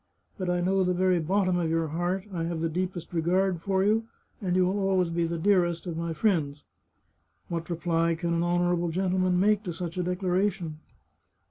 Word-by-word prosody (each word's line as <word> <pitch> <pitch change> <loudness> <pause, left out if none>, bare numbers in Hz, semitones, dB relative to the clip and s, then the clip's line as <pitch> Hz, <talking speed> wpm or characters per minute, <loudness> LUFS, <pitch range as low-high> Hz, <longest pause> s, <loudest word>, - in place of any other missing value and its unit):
But 185 -3 -3
I 180 0 +1
know 190 +2 +2
the 180 0 +1
very 185 -1 +3
bottom 185 +2 +1
of 170 -2 0
your 165 -1 0
heart; 175 +4 -2
I 165 -2 -2
have 170 -1 -3
the 165 0 0
deepest 180 0 -4
regard 175 +1 +1
for 190 +1 +1
you, 220 +3 +2 0.4
and 180 -3 0
you 185 0 +4
will 190 +3 0
always 185 -3 +2
be 170 0 0
the 170 0 -3
dearest 175 -1 +2
of 165 -2 -4
all 170 - -2
my - - -2
friends.' 155 -5 0 0.4
" - - -44
What 170 0 -4
reply 165 -1 +1
can 170 +1 -2
an 165 - +1
honourable 175 0 +1
gentleman 185 +1 +1
make 205 +1 +3
to 175 - -3
such 170 +1 -5
a - - +1
declaration? 180 -2 -1
175 Hz, 205 wpm, -27 LUFS, 165-185 Hz, 0.4 s, you